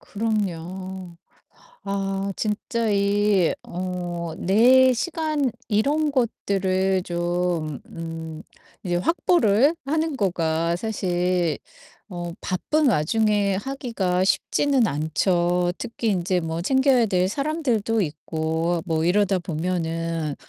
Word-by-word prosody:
그럼요. 190 Hz, -4 st, -4 dB, 0.7 s
아 195 Hz, 0 st, -2 dB
진짜 220 Hz, +1 st, -1 dB
이 200 Hz, -2 st, +2 dB
어 180 Hz, 0 st, -4 dB, 0.3 s
내 255 Hz, +7 st, +5 dB
시간 310 Hz, -2 st, -1 dB, 0.2 s
이런 285 Hz, +8 st, +1 dB
것들을 190 Hz, -6 st, 0 dB
좀 175 Hz, -4 st, -1 dB
음 165 Hz, -1 st, -7 dB, 0.4 s
이제 175 Hz, -2 st, -1 dB
확보를 280 Hz, -, +3 dB
하는 315 Hz, 0 st, 0 dB
거가 170 Hz, -3 st, 0 dB
사실 180 Hz, -6 st, 0 dB, 0.5 s
어 175 Hz, -1 st, -5 dB
바쁜 285 Hz, -, +1 dB
와중에 205 Hz, +2 st, +2 dB
하기가 210 Hz, -8 st, -1 dB
쉽지는 260 Hz, +4 st, +2 dB
않죠. 175 Hz, +4 st, +1 dB
특히 235 Hz, -1 st, -3 dB
인제 185 Hz, -1 st, +1 dB
뭐 165 Hz, 0 st, -3 dB
챙겨야 265 Hz, +2 st, +3 dB
될 185 Hz, -1 st, +2 dB
사람들도 245 Hz, -6 st, 0 dB
있고 160 Hz, +1 st, -2 dB
뭐 160 Hz, -2 st, 0 dB
이러다 195 Hz, +1 st, +2 dB
보면은 165 Hz, -2 st, -2 dB
190 Hz, 190 characters per minute, -23 LUFS, 175-225 Hz, 0.7 s, 내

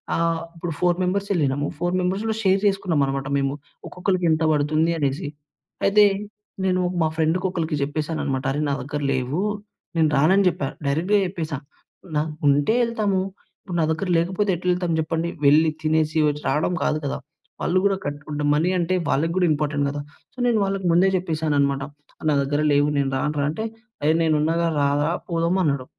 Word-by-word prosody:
ఆహ్, 165 Hz, 0 st, 0 dB
ఇప్పుడు 165 Hz, 0 st, -4 dB
4 175 Hz, -1 st, +2 dB
members 195 Hz, +3 st, -1 dB
ఎళ్ళినాము 145 Hz, -4 st, 0 dB
4 175 Hz, +2 st, -1 dB
members 185 Hz, +3 st, -1 dB
గూడ 220 Hz, -, 0 dB
షేర్ 190 Hz, 0 st, +3 dB
చేసుకున్నాం 190 Hz, -6 st, +1 dB
అన్నమాట 135 Hz, 0 st, -3 dB
మేము. 135 Hz, 0 st, 0 dB, 0.3 s
ఒక్కొక్కలికి 180 Hz, 0 st, -1 dB
ఎంత 160 Hz, +1 st, +1 dB
బడుతుంది 155 Hz, +2 st, +2 dB
అనేసి. 140 Hz, -1 st, -1 dB, 0.6 s
అయితే, 210 Hz, +1 st, +6 dB, 0.6 s
నేను 185 Hz, -1 st, +2 dB, 0.2 s
మా 160 Hz, -, +3 dB
ఫ్రెండ్‌కి 165 Hz, +4 st, +1 dB
ఒకలికి 165 Hz, -3 st, -2 dB
జెప్పేసానన్నమాట. 145 Hz, -2 st, -2 dB
అరే! 145 Hz, +2 st, -1 dB
నా -, -, +1 dB
దగ్గర 145 Hz, +3 st, -4 dB
లేవు. 130 Hz, +6 st, -1 dB, 0.6 s
నేను 160 Hz, -1 st, +4 dB
రానని 185 Hz, +8 st, +4 dB
జెప్పా. 150 Hz, -6 st, 0 dB, 0.2 s
డైరెక్ట్‌గా 165 Hz, +9 st, +2 dB
జెప్పేసా. 165 Hz, -5 st, -4 dB, 0.6 s
నాకుంటే 150 Hz, +2 st, +1 dB
ఎళ్తాము, 210 Hz, -5 st, 0 dB, 0.4 s
ఇప్పుడు 180 Hz, -3 st, -5 dB
నా 160 Hz, -, +3 dB
దగ్గర 160 Hz, +5 st, -2 dB
లేకపోతే 185 Hz, +5 st, 0 dB
ఎట్లెళ్తాము 180 Hz, -1 st, 0 dB
జెప్పండి. 165 Hz, +2 st, -1 dB, 0.2 s
వెళ్లి 155 Hz, +3 st, +6 dB
తినేసి 155 Hz, 0 st, +1 dB
వచ్ 150 Hz, 0 st, -2 dB
రాడం 155 Hz, +4 st, +1 dB
కాదు 150 Hz, -, +1 dB
కదా! 140 Hz, -, -2 dB, 0.4 s
వాళ్ళు 175 Hz, -, +1 dB
గూడా 200 Hz, -1 st, +2 dB
కట్టుకుంట 145 Hz, +1 st, -4 dB
మనీ 160 Hz, +4 st, +2 dB
అంటే 175 Hz, +2 st, +1 dB
వాళ్లకి 165 Hz, +4 st, +1 dB
గూడా 180 Hz, -1 st, +3 dB
ఇంపార్టెంట్ 145 Hz, -1 st, -1 dB
గదా! 145 Hz, +1 st, -4 dB, 0.3 s
సో, -, -, -35 dB
నేను 230 Hz, -3 st, +3 dB
వాళ్ళకి 195 Hz, -1 st, -2 dB
ముందే 185 Hz, +3 st, +5 dB
చెప్పేసాను 160 Hz, -4 st, -1 dB
అనమాట. 140 Hz, -1 st, +1 dB, 0.5 s
నా -, -, +3 dB
దగ్గర 145 Hz, +2 st, 0 dB
లేవు 145 Hz, 0 st, +3 dB
నేను 140 Hz, -1 st, +1 dB
రానురా 150 Hz, +1 st, -1 dB
అంటే 160 Hz, +8 st, -3 dB, 0.4 s
"ఏహ్, 155 Hz, +1 st, +4 dB
నేనున్నాగా 160 Hz, +1 st, +2 dB
రారా" 145 Hz, +2 st, +2 dB, 0.2 s
పోదామన్నాడు. 165 Hz, -5 st, +1 dB
160 Hz, 160 wpm, -23 LUFS, 145-180 Hz, 0.6 s, అయితే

